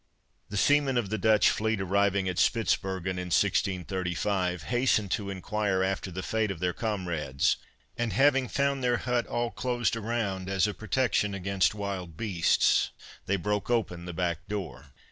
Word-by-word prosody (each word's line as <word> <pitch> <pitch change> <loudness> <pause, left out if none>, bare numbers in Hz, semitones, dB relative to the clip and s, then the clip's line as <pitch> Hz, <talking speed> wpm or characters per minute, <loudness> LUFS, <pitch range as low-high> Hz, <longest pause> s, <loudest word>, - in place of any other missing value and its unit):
The 105 - -4
seamen 140 +2 +3
of 105 -5 -1
the 110 - -1
Dutch 110 0 +4
fleet 110 -1 -1
arriving 100 0 +1
at 90 -1 -1
Spitzbergen, 95 -5 0
in 90 - -4
1635, 90 0 0
hastened 110 - +1
to 100 -2 -1
inquire 100 0 -1
after 95 0 -2
the 95 +1 -5
fate 110 -1 0
of 95 -4 -4
their 90 0 0
comrades; 85 - -1 0.4
and 120 -2 -1
having 135 +4 +3
found 140 0 0
their 120 -1 +2
hut 125 -1 -1
all 120 0 -1
closed 120 +2 -1
around 105 -4 -2
as 95 0 +2
a 105 - -1
protection 110 -3 0
against 95 +1 +1
wild 95 -6 -5
beasts, 90 -6 +2 0.4
they 100 - +2
broke 105 +4 -2
open 95 -8 -1
the 90 - -5
back 85 -2 -2
door. 80 -10 -5
100 Hz, 160 wpm, -28 LUFS, 90-115 Hz, 0.4 s, Dutch